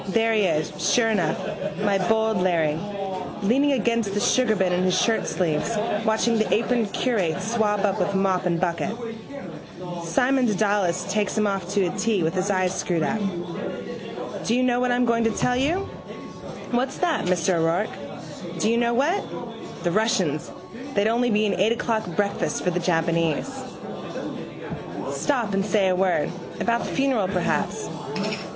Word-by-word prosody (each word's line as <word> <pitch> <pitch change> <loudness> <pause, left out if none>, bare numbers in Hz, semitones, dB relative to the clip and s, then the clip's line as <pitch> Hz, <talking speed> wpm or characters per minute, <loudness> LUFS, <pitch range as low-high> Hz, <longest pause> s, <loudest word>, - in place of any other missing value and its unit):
There 225 +3 +2
he 215 - +3
is, 155 -3 0 0.2
sure 230 -2 +4
enough, 185 -8 +1 0.4
my 200 -1 +2
bold 220 -1 +3
Larry, 165 -4 +2 0.6
leaning 275 +7 +3
against 230 -5 +1
the 205 - +1
sugarbin 215 -5 +3
in 180 +1 +1
his 185 0 +2
shirtsleeves 210 +1 0
watching 220 +1 +2
the 220 - +2
aproned 230 -1 +2
curate 190 -9 0
swab 215 -1 +1
up 195 - 0
with 200 - 0
mop 190 -1 +2
and 170 -1 +1
bucket. 175 +4 -1 1.1
Simon 250 +10 +2
Dedalus 200 -4 +1
takes 205 +1 0
him 215 - +3
off 195 -3 -1
to 200 -2 +3
a 180 +1 -2
tee 215 -3 +1
with 160 +2 0
his 185 +2 0
eyes 185 -2 +2
screwed 170 -3 0
up. 220 - 0 1.3
Do 230 - +2
you 255 - +2
know 245 -1 +2
what 250 0 +2
I'm 245 0 +3
going 230 -1 +2
to 225 - +3
tell 250 +2 +1
you? 300 +9 +1 0.9
What's 255 +2 0
that, 340 - +1
Mr 180 0 +2
O'Rourke? 165 +5 -3
Do 215 - +2
you 230 - +2
know 235 0 +2
what? 320 +11 +2 0.6
The 175 - +1
Russians, 180 -7 +1 0.4
they'd 200 +1 +3
only 240 +2 +2
be 215 -1 +3
an 200 - +1
eight 200 +5 +3
o'clock 225 -2 -1
breakfast 200 -1 0
for 180 - +1
the 180 - 0
Japanese. 165 - +1 1.6
Stop 240 -8 0
and 195 0 +2
say 195 -1 +2
a 185 - +2
word: 185 -4 +1 0.3
about 235 0 +1
the - - -4
funeral 265 -8 +2
perhaps. 185 -2 -1
205 Hz, 160 wpm, -24 LUFS, 185-230 Hz, 1.6 s, sure